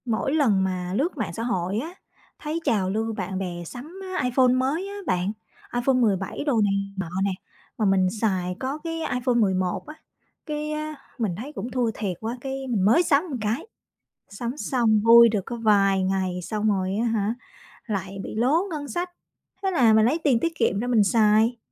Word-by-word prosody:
Mỗi 235 +3 -1
lần 225 -11 +3
mà 180 -1 -2
lướt 300 - 0
mạng 200 -7 -3
xã 225 - -4
hội 195 -4 -1
á, 320 +8 -6 0.5
thấy 310 +2 -3
trào 195 -9 +1
lưu 220 +3 -1
bạn 190 -2 -4
bè 175 -2 -4
sắm 295 - -9 0.2
iPhone 250 +1 +3
mới 275 +9 0
á 400 - -7
bạn, 180 - 0 0.4
iPhone 245 +2 +2
17 205 -5 0
đồ 250 -7 +2
này 205 -1 +2 0.2
nọ 190 -4 -3
nè, 200 - +1 0.5
mà 220 - +1
mình 190 -2 +3
xài 185 -4 0
có 270 +3 -3
cái 330 +1 -5
iPhone 250 0 0
11 185 -5 +1
á, 305 - -8 0.5
cái 300 -1 -3 0.5
mình 215 -8 -1
thấy 270 +8 -7
cũng 250 -3 -5
thua 245 -3 0
thiệt 195 -6 -3
quá, 230 +3 -4
cái 270 0 -4
mình 215 -7 +1
mới 275 - +5
sắm 290 -2 +3
một 260 - -2
cái. 220 - -2 0.6
Sắm 235 +6 -5
xong 235 -7 +2
vui 235 0 +9
được 210 -2 0
có 240 - -5
vài 200 -4 +3
ngày, 185 -1 -1
xong 215 +4 -1
rồi 190 -1 0
á - - +1
hả, 220 -1 0 0.5
lại 195 -3 -4
bị - - -6
lố 265 +10 +3
ngân 295 -3 -4
sách, 350 +4 -3 0.5
thế 385 - +1
là 245 -10 +4
mình 220 0 +5
lấy 290 +8 +2
tiền 260 -6 +3
tiết 335 - 0
kiệm 200 - +1
ra 240 - -2
mình 235 -4 +4
xài. 220 +3 +3
225 Hz, 195 wpm, -25 LUFS, 195-265 Hz, 0.6 s, vui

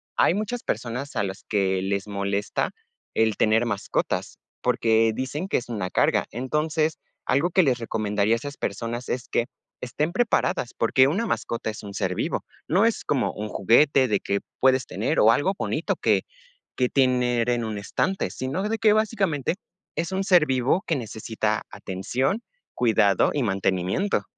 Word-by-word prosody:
hay - - +4
muchas 215 +4 -3
personas 125 +3 -3
a 105 - +2
las 95 0 -5
que 95 -3 0
les 100 +1 -2
molesta 100 0 -1 0.4
el 110 -2 +2
tener 110 +2 +3
mascotas, 105 -4 -2 0.2
porque 115 0 +3
dicen 145 - -4
que - - +2
es 125 - -5
una 105 -6 -3
carga. - - +2
Entonces, 150 +6 -1 0.3
algo 150 +7 +2
que 185 +1 +4
les 130 -5 +2
recomendaría 110 -1 0
a - - -1
esas 145 +4 -7
personas 115 +4 -4
es 125 - -3
que, 120 - 0 0.3
estén 150 +6 -2
preparadas, 225 - +1
porque 130 +3 +4
una 200 +9 0
mascota 115 - -2
es 105 - -7
un 100 - -8
ser 95 -2 -1
vivo. - - -2 0.2
No 190 +7 +4
es 230 - 0
como 135 -4 0
un 105 0 -5
juguete 135 +2 +4
de 105 -3 0
que 100 - -1 0.2
puedes 130 0 +4
tener, - - -1
o 110 - +6
algo 165 +10 +1
bonito - - -1
que - - +2 0.6
que 125 -1 +3
tener 125 -3 +2
en 120 -1 0
un 110 -1 -4
estante, 185 - -1
sino, 135 +9 -3
de 225 - 0
que 220 -1 +4
básicamente, 195 -9 0 0.4
es 165 +3 -2
un 190 +1 0
ser 180 -6 +5
vivo 130 +6 +1
que 165 - +1
necesita 110 -2 -2
atención, 115 - -2 0.3
cuidado 105 -5 +3
y 145 - 0
mantenimiento. 95 - 0
120 Hz, 165 wpm, -25 LUFS, 105-150 Hz, 0.6 s, o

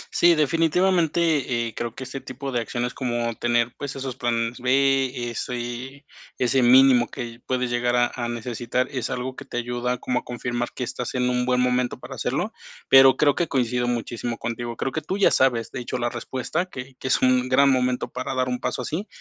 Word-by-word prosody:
Sí, 170 0 +6
definitivamente, 165 -5 +2
eh, 115 - -7
creo 120 -1 -4
que - - -6
este 130 +1 -7
tipo 135 +2 -6
de 120 - 0
acciones 120 +2 -3
como 120 -3 -2
tener, 120 +1 0
pues 145 -2 -5
esos 135 -2 -5
planes 120 -1 -1
B, 130 -1 +1
ese 125 +4 -5 0.3
ese 130 +1 +2
mínimo 125 0 +6
que 120 -1 -7
puedes 125 -1 -1
llegar 120 0 +1
a 120 0 +4
a 120 -2 -3
necesitar, 120 +1 -2
es 130 -5 -3
algo 130 +1 -4
que - - -8
te - - -6
ayuda 120 +1 -2
como 125 +1 -1
a - - -14
confirmar 120 0 -3
que 125 - -3
estás 125 +1 -4
en 125 0 +1
un 125 0 0
buen 125 0 +2
momento 125 0 +1
para - - -9
hacerlo, - - -2 0.4
pero 135 0 +8
creo 145 -1 +4
que 170 +4 -1
coincido 125 -2 0
muchísimo 120 0 -3
contigo. 120 0 -4
Creo 135 - -2
que 155 - -3
tú 190 - -3
ya 205 - +4
sabes, 120 -4 +2
de 135 - -5
hecho, 125 +1 -4
la 120 -1 -1
respuesta 130 +8 -3
que 135 -6 -9
que - - -4
es 130 - +3
un 130 0 +3
gran 140 +1 +5
momento 125 -1 +1
para 130 +1 -4
dar 130 0 0
un 125 - -2
paso 125 - -3
así, 170 - -4
125 Hz, 205 wpm, -24 LUFS, 120-135 Hz, 0.4 s, pero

